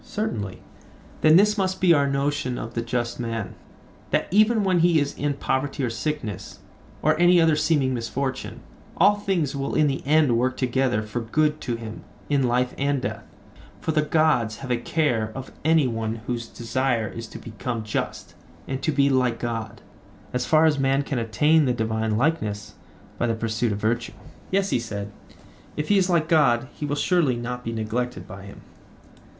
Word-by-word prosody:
Certainly. 110 - -4 0.6
Then 155 0 +6
this 210 +3 +5
must 190 -1 0
be 180 -2 +5
our 140 -2 +3
notion 140 -2 -1
of 115 - -6
the 115 - -1
just 120 0 -2
man, 115 -4 -3 0.6
that - - +1
even 215 +2 +4
when 185 -2 +2
he 170 -1 +4
is 145 -1 -1
in 145 -1 -1
poverty 135 0 -1
or 120 - 0
sickness, 115 - -4 0.5
or - - +4
any 175 0 +6
other 165 -2 +4
seeming 150 -4 +2
misfortune, 130 +3 -3 0.4
all 200 +4 +6
things 180 -9 -1
will 135 0 -3
in 155 - +4
the 135 -2 0
end 150 -3 +3
work 130 +1 0
together 125 -3 +1
for 110 +3 -4
good 150 +6 0
to 120 - -2
him 115 -1 -8 0.3
in 145 -2 +2
life 125 0 +1
and 140 -1 0
death: - - -3 0.6
for 160 - -1
the 155 - +2
gods 150 -8 +2
have 125 - -4
a 120 - +2
care 120 -5 0
of 130 0 -7
any 160 -1 +4
one 115 -2 -2
whose 120 -2 -3
desire 120 -1 -1
is 115 0 -7
to - - -10
become 115 +1 -5
just 105 - -4 0.3
and 135 0 -3
to 155 - +1
be 140 -1 +3
like 130 -3 +2
God, 115 -2 -5 0.5
as 125 - -1
far 155 0 +5
as 150 -3 +3
man 135 +1 +2
can 135 -2 -2
attain 150 +7 +3
the 125 - +2
divine 110 -1 -1
likeness, 110 -8 -1 0.5
by 120 - +1
the 115 - 0
pursuit 110 0 -1
of 100 - -2
virtue? 115 +3 -1 0.4
Yes, 195 +1 +1
he - - +2
said; 100 -3 -5 0.7
if 150 0 -3
he 205 -1 +5
is 185 -1 +1
like 165 -3 +2
God 130 -7 +3
he 150 - -5
will 145 - -1
surely 155 -4 +2
not 125 +1 -5
be 115 - -3
neglected 110 -3 -3
by 100 +1 -10
him. 100 - -12
130 Hz, 185 wpm, -24 LUFS, 115-155 Hz, 0.7 s, Then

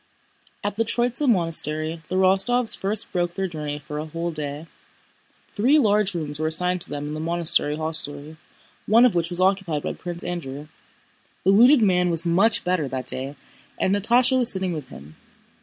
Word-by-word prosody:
At 205 0 -3
the 225 - +2
Tróitsa 240 +4 0
monastery 160 -4 0
the 185 - -3
Rostóvs 195 +6 +2
first 200 +2 -3
broke 175 -1 -2
their 195 - -2
journey 150 -4 -5
for 150 +1 -7
a 155 - -5
whole 170 +2 -4
day. 150 0 -5 0.9
Three 255 +9 +3
large 210 -7 +2
rooms 150 -3 -4
were 155 - 0
assigned 180 +3 +1
to - - +2
them 145 0 -5
in - - -5
the 155 - -5
monastery 160 -2 +1
hostelry, 155 -1 -3 0.5
one 230 +4 +6
of 250 - +3
which 170 -1 -1
was 175 0 0
occupied 185 -5 0
by - - -3
Prince 175 -1 -7
Andrew. 150 -4 -6 0.7
The 195 - +4
wounded 245 +4 +6
man 180 -3 +2
was 165 0 +2
much 195 +6 +3
better 180 -5 0
that 130 0 -5
day 135 +2 -6 0.4
and 190 - +1
Natásha 245 +5 +3
was 245 -1 +2
sitting 190 -2 -2
with 150 -5 -7
him. 75 +3 -13
175 Hz, 180 wpm, -23 LUFS, 155-200 Hz, 0.9 s, one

